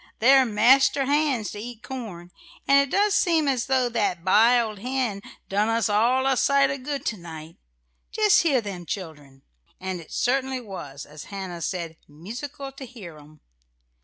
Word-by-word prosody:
They're 265 +2 +5
master 265 +6 +4
hands 280 -6 0
to 205 - -8
eat 235 +1 -9
corn, 205 -10 -8 0.4
and 275 0 +6
it 280 -1 +1
does 405 +4 +2
seem 335 -7 +2
as 260 -3 0
though 260 -2 +2
that 205 -7 -1
biled 220 +1 +3
hen 245 -3 -2 0.3
done 205 +3 0
us 225 -3 +1
all 240 +6 +2
a 270 -1 +3
sight 275 +1 +3
o' 275 - -4
good 275 +1 -5
to 215 - -2
night. 160 -2 -10 0.5
Just 425 -1 +4
hear 280 -7 +2
them 185 -5 -7
children." 150 -8 -7 0.4
And 185 -2 -5
it 160 - -16
certainly 265 +1 0
was, 165 - -8
as 150 0 -11
Hannah 190 -4 -7
said, 165 -2 -4
"musical 240 - -8
to 270 - -11
hear 190 -11 -11
'em." 150 0 -18
230 Hz, 165 wpm, -24 LUFS, 185-270 Hz, 0.5 s, and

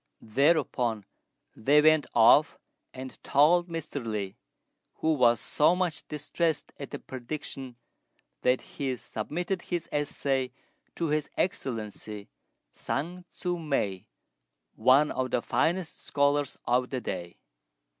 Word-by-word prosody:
Thereupon 125 - +1 0.5
they 140 +7 +4
went 155 0 +5
off 120 +6 +6 0.3
and 130 0 -9
told 170 +5 +4
Mr. 160 -5 -4
Li, 105 -3 -3 0.6
who 160 0 +1
was 120 -5 +4
so 155 +4 +3
much 180 -3 -2
distressed 155 +2 -2
at 140 - -6
the - - -5
prediction 130 0 -7 0.7
that 125 0 +3
he 135 -2 -3
submitted 175 - -3
his 175 -2 -3
essay 135 -3 -1 0.4
to 165 -2 -1
His 150 0 0
Excellency 110 - -3 0.4
Sun 175 +6 -3
Tzŭ 175 -2 -3
mei, 100 -11 -1 0.7
one 130 +6 +4
of 130 0 -1
the 125 - +1
finest 170 +6 0
scholars 140 -1 +1
of 125 +1 +2
the 130 - -2
day. 85 -7 -5
140 Hz, 115 wpm, -28 LUFS, 125-155 Hz, 0.7 s, off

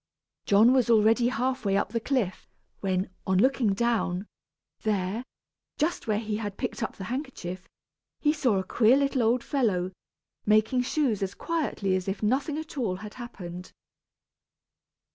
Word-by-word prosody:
John 215 +5 +6
was 255 -3 +3
already 225 +2 +5
half 255 +1 -1
way 195 -1 +2
up 200 - 0
the 230 +2 -1
cliff, 225 -7 -2 0.3
when, 190 -1 -1 0.2
on 190 -1 +3
looking 235 -2 +3
down, 215 -5 0 0.6
there, 210 +1 -1 0.5
just 315 -2 -1
where 215 -2 +2
he 215 -1 -2
had 205 -3 -5
picked - - -3
up - - -3
the 190 - -7
handkerchief, 190 - -5 0.5
he 300 0 +3
saw 255 -9 +2
a 190 - 0
queer 230 +6 +4
little 275 -2 +1
old 235 +2 +2
fellow, 195 -10 0 0.5
making 215 +4 +3
shoes 250 -5 0
as 195 -1 -2
quietly 285 - -1
as 185 0 -2
if 195 +2 -3
nothing 275 +7 +1
at 310 -2 -6
all 205 -7 0
had 210 +3 -8
happened. 180 -8 -8
220 Hz, 155 wpm, -27 LUFS, 195-255 Hz, 0.6 s, John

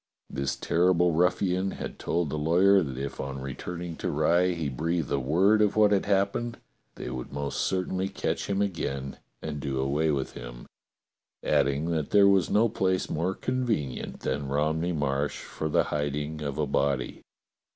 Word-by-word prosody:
This 70 0 -2
terrible 90 +4 +2
ruffian 90 +3 +1
had - - -6
told 85 -4 -1
the - - -2
lawyer 95 +6 +5
that 70 -6 -4
if 70 +1 -5
on 65 0 -4
returning 85 +6 -5
to - - -2
Rye 85 +4 +3
he 80 -3 -2
breathed 80 +4 -2
a 70 - +2
word 95 +11 +3
of 105 -2 +3
what 105 -1 +5
had 100 -1 +2
happened 100 +4 0 0.4
they - - -6
would 65 -1 -6
most 70 0 -3
certainly 95 0 -1
catch - - -2
him 100 0 +1
again 70 -8 -3 0.2
and 75 -2 -4
do 70 -2 -2
away 70 +4 +1
with 70 -3 -1
him, - - -9 0.8
adding 70 +4 +1
that 80 -3 -1
there 100 -1 +6
was 95 -4 +4
no 110 +3 +4
place 95 -4 0
more 90 +4 -1
convenient 115 - -2
than 70 +1 -2
Romney 80 +5 0
Marsh 75 -2 -1
for 80 - -4
the - - +3
hiding 75 +1 -2
of 70 -2 -3
a 75 - +1
body. 70 -1 -1
80 Hz, 170 wpm, -27 LUFS, 70-95 Hz, 0.8 s, there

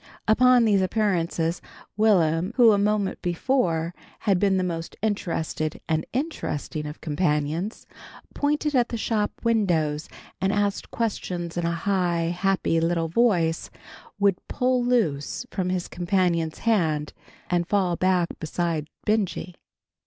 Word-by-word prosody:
Upon 250 +2 +5
these 205 -3 +3
appearances, 175 -4 0 0.3
Will'm, 185 -3 +3
who 240 -3 +7
a 205 - +3
moment 205 -1 0
before 175 -3 0 0.3
had 195 -3 +2
been 195 -1 +3
the 185 - +1
most 165 -2 -4
interested 165 -7 -2
and 160 0 0
interesting 190 - -3
of 150 - -9
companions, 155 +4 -1 0.5
pointing 295 +1 0
at 245 -2 +3
the 235 - -3
shop 215 -2 0
windows 170 -10 +1 0.3
and 190 +1 +2
asking 205 -1 0
questions 180 -6 -3
in 175 -1 -1
a 170 - 0
high, 175 -3 +1
happy 190 -3 +1
little 165 0 0
voice, 170 -5 +2 0.5
would 200 -2 +3
pull 255 -1 +1
loose 225 - 0
from 185 -2 -1
his 180 -1 -1
companion's 175 -3 0
hand 160 -10 0 0.3
and 175 -1 0
fall 185 -4 +1
back 180 -1 +2
beside 160 -1 -2 0.2
Benjy. 200 -4 0
180 Hz, 130 wpm, -25 LUFS, 165-210 Hz, 0.5 s, who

